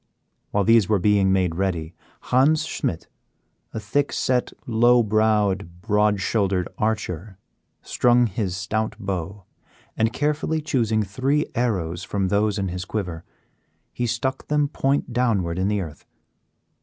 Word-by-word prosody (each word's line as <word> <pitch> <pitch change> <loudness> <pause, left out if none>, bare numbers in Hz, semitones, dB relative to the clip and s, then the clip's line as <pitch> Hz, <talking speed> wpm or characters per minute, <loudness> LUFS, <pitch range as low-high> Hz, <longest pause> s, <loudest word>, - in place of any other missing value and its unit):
While 100 - +1
these 115 -1 +4
were 105 - +4
being 100 0 +3
made 95 -3 +2
ready, 85 -2 -2 0.3
Hans 140 +5 +3
Schmidt, - - -3 0.6
a - - -4
thick 135 +7 0
set, 125 -1 0
low 120 +1 +4
browed, 105 -4 +1
broad 105 -1 +2
shouldered 95 -3 0
archer, 105 -3 -2 0.5
strung 120 0 +3
his 95 -3 -2
stout 110 +4 -2
bow, 95 0 -4 0.5
and 110 +1 +1
carefully 150 +4 -1
choosing 115 -8 0
three 130 +9 0
arrows 90 -8 -1
from 95 -1 -1
those 105 +1 +1
in 95 -2 -1
his 90 +1 -4
quiver, 90 -6 -4 0.7
he 120 - -2
stuck 130 +3 -2
them 150 -1 +1
point 135 -3 0
downward 100 -9 0
in 95 - +1
the 105 -1 0
earth. 80 -4 -8
105 Hz, 135 wpm, -23 LUFS, 95-120 Hz, 0.7 s, these